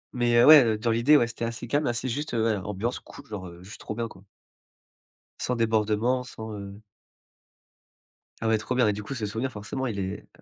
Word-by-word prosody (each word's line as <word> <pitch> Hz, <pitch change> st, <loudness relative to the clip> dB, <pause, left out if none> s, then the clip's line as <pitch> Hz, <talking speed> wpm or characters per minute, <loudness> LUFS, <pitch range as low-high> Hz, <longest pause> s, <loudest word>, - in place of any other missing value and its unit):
Mais, 120 Hz, -1 st, +2 dB
heu, 120 Hz, -, +7 dB
ouais, 150 Hz, -3 st, +10 dB
heu, 110 Hz, -2 st, +1 dB
dans 115 Hz, +1 st, 0 dB
l'idée, 125 Hz, +7 st, +5 dB
ouais, 120 Hz, -, +3 dB
c'était 115 Hz, 0 st, -6 dB
assez 115 Hz, +1 st, -4 dB
calme, 145 Hz, +4 st, 0 dB
assez 120 Hz, +2 st, -1 dB
juste, 145 Hz, +1 st, -3 dB
heu, -, -, +1 dB
voilà, 110 Hz, -4 st, 0 dB
ambiance 105 Hz, +5 st, -2 dB
cool 140 Hz, -, -14 dB
genre, 100 Hz, -4 st, -7 dB
heu, 85 Hz, +1 st, -12 dB
juste 105 Hz, -, -11 dB
trop 105 Hz, -, -5 dB
bien, 115 Hz, -1 st, -2 dB
quoi. 95 Hz, -2 st, -15 dB, 1.2 s
Sans 125 Hz, -, -1 dB
débordement, 115 Hz, +2 st, +1 dB
sans, 110 Hz, -3 st, -8 dB
heu 100 Hz, +1 st, -9 dB, 1.6 s
Ah 115 Hz, -, -1 dB
ouais, 110 Hz, 0 st, +3 dB
trop 125 Hz, +4 st, -3 dB
bien. 125 Hz, -4 st, +4 dB
Et 105 Hz, -, +2 dB
du 105 Hz, +1 st, -6 dB
coup, 135 Hz, -, -6 dB
ce 115 Hz, -5 st, -3 dB
souvenir, 115 Hz, +6 st, -3 dB
forcément, 120 Hz, +6 st, -5 dB
il 100 Hz, -4 st, -4 dB
est, 95 Hz, +1 st, -3 dB
heu, -, -, -26 dB
115 Hz, 225 wpm, -26 LUFS, 105-125 Hz, 1.6 s, ouais